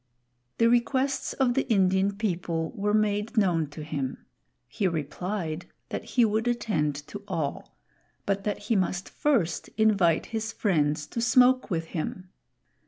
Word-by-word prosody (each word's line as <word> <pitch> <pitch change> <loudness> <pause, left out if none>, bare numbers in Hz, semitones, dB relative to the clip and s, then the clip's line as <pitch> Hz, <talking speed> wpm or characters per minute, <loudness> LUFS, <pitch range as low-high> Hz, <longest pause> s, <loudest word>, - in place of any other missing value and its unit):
The 230 - +4
requests 260 +3 +1
of 260 -3 +2
the 270 +1 -1
Indian 190 0 +3
people 175 -5 -2
were 205 -2 -1
made 215 +2 +1
known 175 -7 +3
to 150 +1 -8
him; 140 -4 -4 0.4
he 195 - -1
replied 170 +1 -3 0.2
that - - -4
he 245 -2 +3
would 220 +2 0
attend 195 -12 0
to 205 - -8
all, 145 -4 -4 0.5
but 195 0 0
that 210 - -1
he 230 - -1
must 185 -1 0
first 235 - 0
invite 200 -7 +3
his 220 0 -2
friends 150 -8 +1
to 235 - -4
smoke 250 +2 +4
with 165 -4 -1
him. 180 +3 -4
200 Hz, 145 wpm, -27 LUFS, 165-225 Hz, 0.5 s, The